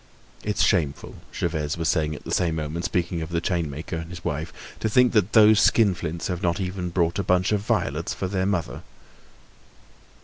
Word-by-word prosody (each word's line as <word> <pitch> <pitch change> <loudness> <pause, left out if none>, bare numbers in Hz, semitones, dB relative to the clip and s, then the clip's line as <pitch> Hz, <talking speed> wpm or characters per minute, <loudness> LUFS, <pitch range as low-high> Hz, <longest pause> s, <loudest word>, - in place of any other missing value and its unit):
"It's 105 -1 0
shameful!" 80 -8 0
Gervaise 75 +1 -2
was 80 -1 -1
saying 75 -3 +1
at - - -11
the - - -5
same 85 -3 +1
moment, 80 +2 -3
speaking 85 -1 -1
of 80 - -5
the 85 -1 0
chainmaker 85 -3 -3
and 80 0 -6
his 90 0 -10
wife. 75 +3 -3 0.3
"To 110 - -1
think 125 +3 +4
that 105 -2 +2
those 110 -1 +7
skinflints 90 -8 +2
have 90 -1 -3
not 85 +1 0
even 90 -1 -3
brought 85 +1 0
a - - 0
bunch 90 +2 +2
of 105 - +2
violets 105 - -1
for - - -3
their 95 0 -1
mother!" 90 -5 -2
90 Hz, 190 wpm, -24 LUFS, 80-95 Hz, 0.3 s, those